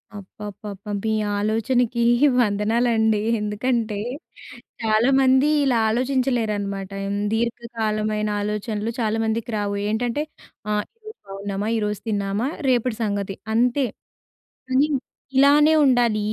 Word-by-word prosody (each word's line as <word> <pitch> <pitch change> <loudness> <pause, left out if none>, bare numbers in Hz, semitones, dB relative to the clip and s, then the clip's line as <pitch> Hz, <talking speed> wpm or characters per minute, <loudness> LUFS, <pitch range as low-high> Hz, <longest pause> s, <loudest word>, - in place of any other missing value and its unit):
అబ్బబ్బబ్బా! 205 +1 -8
మీ 220 - +1 0.2
ఆలోచనకి 235 +3 +1 0.4
వందనాలండి. 220 0 +2 0.2
ఎందుకంటే 215 +1 -1 0.9
చాలామంది 260 +5 +4 0.2
ఇలా 255 -4 +2
ఆలోచించలేరన్నమాట. 220 -6 -1 0.4
దీర్ఘకాలమైన 220 -2 -1
ఆలోచనలు 210 +1 -2
చాలామందికి 225 +1 -1
రావు. 200 -1 -2
ఏంటంటే 240 +5 -1 0.5
ఆహ్, 210 0 +1 0.2
ఈరోజు 435 0 -11
బాగున్నామా, 200 +1 -4
ఈరోజు 210 -2 -2
తిన్నామా, 200 +3 -1 0.2
రేపటి 245 -2 +1
సంగతి 200 -2 -2 0.2
అంతే. 250 +4 +2 0.8
కానీ 270 +4 +3 0.5
ఇలానే 295 +3 +6
ఉండాలి, 240 -5 +3
220 Hz, 90 wpm, -23 LUFS, 210-245 Hz, 0.9 s, ఇలానే